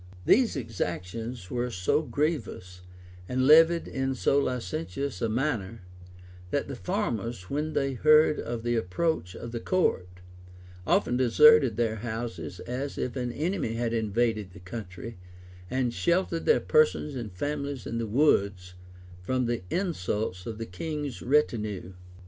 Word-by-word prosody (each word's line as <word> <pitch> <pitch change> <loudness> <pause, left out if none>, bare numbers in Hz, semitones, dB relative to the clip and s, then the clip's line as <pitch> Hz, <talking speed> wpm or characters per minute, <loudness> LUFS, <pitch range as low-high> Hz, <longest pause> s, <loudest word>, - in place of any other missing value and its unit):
These 240 -4 +4
exactions 110 -1 -4
were 125 0 -1
so 90 +6 +1
grievous, 125 - -3 0.5
and 130 0 +1
levied 165 +3 +6
in 135 0 -2
so 140 +2 +2
licentious 120 -2 -3
a 115 - +1
manner, 115 -5 -2 0.7
that 140 - -1
the 140 - -5
farmers, 120 - -3
when 150 +2 -1
they 135 -1 0
heard 155 +3 +5
of 115 -1 -4
the 120 0 0
approach 100 - -1
of 120 - -7
the 115 - -3
court, 140 - +1 0.8
often 125 - +2
deserted 130 -1 +6
their 115 -2 0
houses, 110 -7 -5
as 130 +3 -4
if 125 - -3
an 125 -2 -2
enemy 155 - -2
had 115 0 -1
invaded 110 -3 0
the 100 - -12
country;[*] 95 +2 -8 0.5
and 130 -2 0
sheltered 170 +1 0
their 465 - +5
persons 465 - +2
and 120 -5 -5
families 140 +5 -4
in 115 - -3
the 115 - -2
woods, 100 -8 +2 0.5
from 130 +7 0
the 120 0 -1
insults 105 - -2
of 110 -2 -5
the 115 - -4
king's 145 - -5
retinue. 110 -9 0
120 Hz, 140 wpm, -28 LUFS, 105-145 Hz, 0.8 s, levied